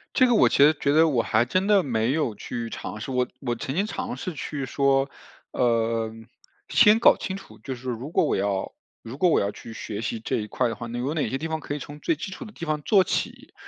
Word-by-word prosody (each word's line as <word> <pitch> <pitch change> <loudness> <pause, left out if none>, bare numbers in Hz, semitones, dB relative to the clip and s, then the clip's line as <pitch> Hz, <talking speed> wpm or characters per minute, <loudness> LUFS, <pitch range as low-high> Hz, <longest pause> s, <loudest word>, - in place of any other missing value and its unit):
这 255 - +6
个 245 - +3
我 - - +6
其 - - +1
实 150 +3 +7
觉 140 0 +1
得 160 +2 +5
我 125 -6 +2
还 110 +2 +2
真 185 +9 0
的 205 -2 +5
没 120 -3 0
有 150 -8 0
去 115 +3 -5
尝 110 - -6
试， 120 - -5
我 125 -1 +1
我 120 -3 -1
曾 130 +3 -5
经 200 +4 +1
尝 255 +1 -4
试 185 -7 -5
去 140 -1 -4
说， 140 0 +2 0.4
呃， 115 -2 +1 0.6
先 210 +2 +6
搞 235 - +6
清 190 - -4
楚。 - - -15
就 130 - -6
是 125 +1 -9
如 125 +4 -4
果 - - +2
我 - - +1
要 100 -1 -1 0.3
如 115 +3 -8
果 175 +3 +3
我 - - +4
要 100 - 0
去 115 - -11
学 110 -1 -6
习 115 0 -3
这 110 - -2
一 105 - -3
块 120 +3 0
的 115 - -3
话， 120 - -7
有 120 +5 -3
哪 155 - -1
些 135 - -2
地 160 +3 -4
方 160 0 -2
可 145 - -5
以 - - -3
从 145 +1 -9
最 335 - 0
基 210 - -6
础 230 - -8
的 215 - -11
地 170 -5 -7
方 155 -1 -1
做 195 +4 +5
起。 - - -3
135 Hz, 275 characters per minute, -25 LUFS, 115-165 Hz, 0.6 s, 实